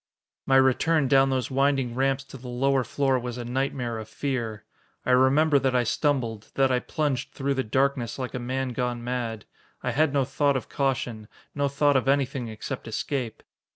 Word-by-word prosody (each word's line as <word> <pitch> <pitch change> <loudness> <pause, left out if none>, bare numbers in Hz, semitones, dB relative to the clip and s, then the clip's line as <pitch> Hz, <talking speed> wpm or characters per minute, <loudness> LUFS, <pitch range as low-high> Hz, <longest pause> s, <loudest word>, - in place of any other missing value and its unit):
My 135 - +4
return 135 +3 +4
down 135 +1 +5
those 130 0 -1
winding 135 -2 +1
ramps 135 +1 +1
to 135 - -11
the 125 0 -10
lower 130 +2 +1
floor 135 0 +1
was 120 0 -5
a 120 - -5
nightmare 125 -2 -2
of 110 0 -8
fear. 115 -6 -3 0.4
I - - +1
remember 140 +4 +5
that 130 -1 0
I 125 - +3
stumbled, 120 -4 -1
that 135 -1 +3
I 125 - +3
plunged 140 -1 -2
through 140 0 0
the 130 -1 -1
darkness 130 +1 0
like 130 -2 -4
a 125 - -3
man 130 +2 -2
gone 120 -1 -2
mad. 120 -3 -3 0.4
I - - 0
had 155 0 +2
no 140 -2 +2
thought 140 +1 +1
of 130 - -7
caution, 125 -5 -2 0.3
no 145 0 0
thought 140 +1 +2
of 130 0 +2
anything 135 -2 +1
except 115 +3 -6
escape. 120 +1 -3
130 Hz, 190 wpm, -26 LUFS, 120-140 Hz, 0.4 s, down